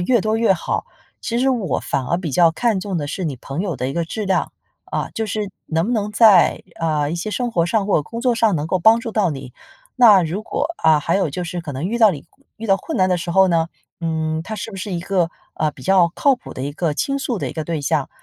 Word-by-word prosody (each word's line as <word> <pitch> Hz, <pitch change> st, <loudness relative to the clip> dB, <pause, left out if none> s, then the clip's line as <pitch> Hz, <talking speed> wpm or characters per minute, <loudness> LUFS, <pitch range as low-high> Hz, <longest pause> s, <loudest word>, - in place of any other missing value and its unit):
越 230 Hz, +5 st, +2 dB
多 215 Hz, +1 st, +1 dB
越 225 Hz, -3 st, +4 dB
好。 170 Hz, -, -3 dB, 0.4 s
其 235 Hz, -1 st, -1 dB
实 265 Hz, +2 st, +2 dB
我 230 Hz, -8 st, -1 dB
反 130 Hz, -, -2 dB
而 170 Hz, -, +1 dB
比 175 Hz, -4 st, -4 dB
较 170 Hz, +1 st, +5 dB
看 215 Hz, +3 st, 0 dB
重 190 Hz, -1 st, -3 dB
的 145 Hz, -, -2 dB
是 175 Hz, +5 st, -4 dB
你 140 Hz, -5 st, -3 dB
朋 135 Hz, +6 st, -5 dB
友 185 Hz, -7 st, -2 dB
的 130 Hz, +1 st, -2 dB
一 -, -, -4 dB
个 170 Hz, -, 0 dB
质 215 Hz, +5 st, -4 dB
量， 190 Hz, -1 st, 0 dB, 0.3 s
啊， -, -, -3 dB
就 225 Hz, -, -1 dB
是 210 Hz, 0 st, -3 dB, 0.2 s
能 165 Hz, +3 st, 0 dB
不 245 Hz, -, -1 dB
能 210 Hz, -3 st, -1 dB
在， 210 Hz, -5 st, +5 dB, 0.2 s
呃， 155 Hz, -3 st, 0 dB
一 -, -, -1 dB
些 175 Hz, +5 st, -4 dB
生 240 Hz, +4 st, -2 dB
活 170 Hz, -4 st, +2 dB
上 200 Hz, +3 st, 0 dB
或 205 Hz, -, +3 dB
者 -, -, -2 dB
工 230 Hz, +10 st, -7 dB
作 250 Hz, -2 st, +2 dB
上 225 Hz, -3 st, +2 dB
能 150 Hz, 0 st, -2 dB
够 185 Hz, +3 st, 0 dB
帮 220 Hz, +6 st, +5 dB
助 230 Hz, -, -5 dB
到 210 Hz, -4 st, +2 dB
你。 135 Hz, -3 st, -7 dB, 0.4 s
那 215 Hz, -7 st, +7 dB
如 175 Hz, +6 st, -3 dB
果 290 Hz, -, -2 dB, 0.2 s
啊， 155 Hz, -1 st, +5 dB
还 165 Hz, +4 st, 0 dB
有 195 Hz, -4 st, +1 dB
就 180 Hz, +6 st, -4 dB
是 175 Hz, +1 st, -4 dB
可 150 Hz, -4 st, -6 dB
能 140 Hz, +7 st, -3 dB
遇 235 Hz, +4 st, -2 dB
到 220 Hz, -3 st, +7 dB
你 145 Hz, -5 st, -7 dB, 0.3 s
遇 225 Hz, -, -6 dB
到 195 Hz, -2 st, +4 dB
困 325 Hz, -, -5 dB
难 185 Hz, -, +4 dB
的 180 Hz, -, +2 dB
时 170 Hz, 0 st, -4 dB
候 190 Hz, +2 st, +5 dB
呢， 165 Hz, -1 st, +1 dB, 0.3 s
嗯， 160 Hz, -1 st, -1 dB
他 215 Hz, -, -6 dB
是 215 Hz, +2 st, -5 dB
不 195 Hz, -, -9 dB
是 200 Hz, +1 st, -5 dB
一 175 Hz, -, -2 dB
个， 175 Hz, -2 st, 0 dB, 0.2 s
啊， 155 Hz, -1 st, 0 dB
比 -, -, -15 dB
较 185 Hz, -3 st, +4 dB
靠 280 Hz, -2 st, +3 dB
谱 -, -, -11 dB
的 -, -, -7 dB
一 145 Hz, +1 st, -3 dB
个 160 Hz, 0 st, -1 dB
倾 275 Hz, -, -1 dB
诉 250 Hz, -5 st, -2 dB
的 -, -, -3 dB
一 -, -, -8 dB
个 160 Hz, -, -4 dB
对 165 Hz, -2 st, -2 dB
象。 150 Hz, -2 st, 0 dB
185 Hz, 295 characters per minute, -20 LUFS, 160-215 Hz, 0.4 s, 那